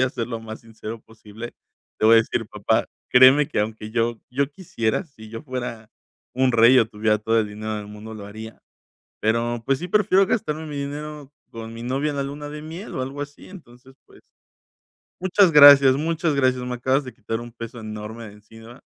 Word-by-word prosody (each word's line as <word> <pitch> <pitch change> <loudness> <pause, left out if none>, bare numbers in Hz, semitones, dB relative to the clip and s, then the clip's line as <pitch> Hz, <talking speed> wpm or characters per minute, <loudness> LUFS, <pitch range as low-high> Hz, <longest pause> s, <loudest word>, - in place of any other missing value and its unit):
Voy - - +4
a 130 - +3
ser, 115 -4 -4
lo 115 -2 -5
más 110 0 -9
sincero 115 0 -9
posible. 110 +1 -11 0.5
Le 110 - +4
voy 115 - +7
a - - +8
decir: 115 - -1
"Papá, - - 0 0.2
créeme 130 +3 +7
que - - -1
aunque 110 0 -4
yo 115 0 -1
yo 140 +3 -1
quisiera. 130 - -2
Si 110 -9 -15
yo 115 +1 -8
fuera 125 -5 -6 0.4
un 130 0 +2
rey, 120 +2 +6
o 115 - +4
tuviera 105 0 0
todo 115 +2 +1
el 110 - +1
dinero 110 +1 -5
en 105 - -4
el - - -11
mundo, 105 +1 -10
lo 105 -2 -9
haría. 110 +2 -10 0.6
Pero, 115 +1 0
pues 135 -1 +1
sí 180 - -5
prefiero 195 0 +3
gastarme 160 -7 -2
mi 150 - -6
dinero, 145 0 -6 0.2
con 115 0 -9
mi 115 - -9
novia, 135 +4 -1
en 140 - -5
la 140 - -1
luna 145 +1 -6
de 150 0 -8
miel, 165 +7 -8
o - - -2
algo 135 +3 -5
así". 145 0 -9
Entonces, 130 -7 -15
pues - - -20 1.0
Muchas 185 -1 +4
gracias, 140 -3 +9
muchas 160 0 -1
gracias. 130 -2 +1
Me 125 0 -4
acabas 130 +3 0
de 125 - -8
quitar, 115 0 -5
un 120 0 -10
peso 115 0 -8
enorme 110 +1 -7
de 100 - -13
encima. 115 +3 -15
120 Hz, 210 wpm, -23 LUFS, 110-145 Hz, 1.0 s, gracias